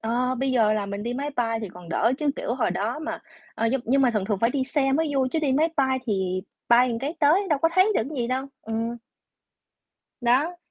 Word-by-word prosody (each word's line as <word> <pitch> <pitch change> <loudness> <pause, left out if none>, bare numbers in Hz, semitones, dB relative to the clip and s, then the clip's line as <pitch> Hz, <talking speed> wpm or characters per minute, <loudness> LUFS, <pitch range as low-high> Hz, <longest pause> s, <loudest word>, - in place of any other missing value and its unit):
Ờ, 245 +3 0
bây 265 0 0
giờ 220 -4 +3
là 210 -2 -1
mình 200 +1 -5
đi 240 +1 -3
máy 285 +3 -3
bay 230 -2 0
thì 210 - -5
còn 180 -1 -13
đỡ 230 +8 +2
chứ, 300 -2 +1
kiểu, - - -2
hồi - - 0
đó - - -2
mà 320 +1 -4 0.4
ờ, 230 - 0
nhưng 270 - +1
nhưng 270 +3 +3
mà 250 - +4
thường 210 -4 -1
thường 205 -2 -1
phải 230 - +3
đi 265 0 -1
xe 270 -1 0
mới 320 +2 +1
vui 260 -1 +2
chứ 325 - +1
đi 285 -4 +1
máy 310 +4 +3
bay 265 -1 +2
thì 185 -3 -1 0.3
bay 245 +2 +6
một 230 -1 -2
cái 285 +5 -3
tới 340 +8 +4
đâu 300 - +2
có 330 +4 +3
thấy 370 +2 +5
được - - +2
cái 305 - -7
gì 235 - -1
đâu. 260 +2 -1 0.2
Ừm. 225 +1 -3 1.2
Đó. 270 +9 +2
255 Hz, 250 wpm, -25 LUFS, 225-285 Hz, 1.2 s, bay